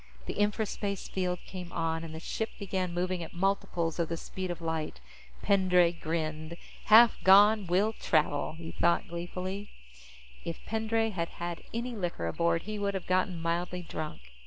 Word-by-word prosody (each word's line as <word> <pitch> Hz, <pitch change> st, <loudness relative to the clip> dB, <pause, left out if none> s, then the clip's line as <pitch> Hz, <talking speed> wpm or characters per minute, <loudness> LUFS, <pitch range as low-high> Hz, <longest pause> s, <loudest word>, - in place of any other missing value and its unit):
The -, -, -4 dB
infraspace 205 Hz, -1 st, -1 dB
field 180 Hz, -1 st, -1 dB
came 180 Hz, -2 st, -7 dB
on, 165 Hz, -1 st, -1 dB
and 160 Hz, -1 st, -7 dB
the -, -, -5 dB
ship 220 Hz, +6 st, -3 dB
began 190 Hz, -3 st, -2 dB
moving 180 Hz, +1 st, -1 dB
at 165 Hz, -, -8 dB
multiples 175 Hz, -3 st, 0 dB
of 170 Hz, -, 0 dB
the 165 Hz, -, -2 dB
speed 185 Hz, +2 st, -5 dB
of 175 Hz, -1 st, -4 dB
light. 160 Hz, -2 st, -3 dB, 0.4 s
Pendray 180 Hz, -3 st, +4 dB
grinned. 160 Hz, -1 st, -3 dB, 0.3 s
Half 225 Hz, +2 st, +7 dB
gone, 205 Hz, +1 st, +7 dB
will 195 Hz, +6 st, +2 dB
travel, 155 Hz, -7 st, +1 dB
he 165 Hz, 0 st, -7 dB
thought 170 Hz, +3 st, +2 dB
gleefully. 180 Hz, +3 st, -5 dB, 0.7 s
If 165 Hz, -, -6 dB
Pendray 225 Hz, 0 st, 0 dB
had 170 Hz, -4 st, -2 dB
had 175 Hz, 0 st, -5 dB
any 235 Hz, +1 st, -3 dB
liquor 175 Hz, -, -3 dB
aboard, 165 Hz, -, +1 dB
he 215 Hz, 0 st, -4 dB
would 200 Hz, -1 st, -1 dB
have 190 Hz, -, -3 dB
gotten 185 Hz, -1 st, +1 dB
mildly 175 Hz, +2 st, -2 dB
drunk. 150 Hz, -, -6 dB
180 Hz, 160 wpm, -30 LUFS, 165-200 Hz, 0.7 s, Half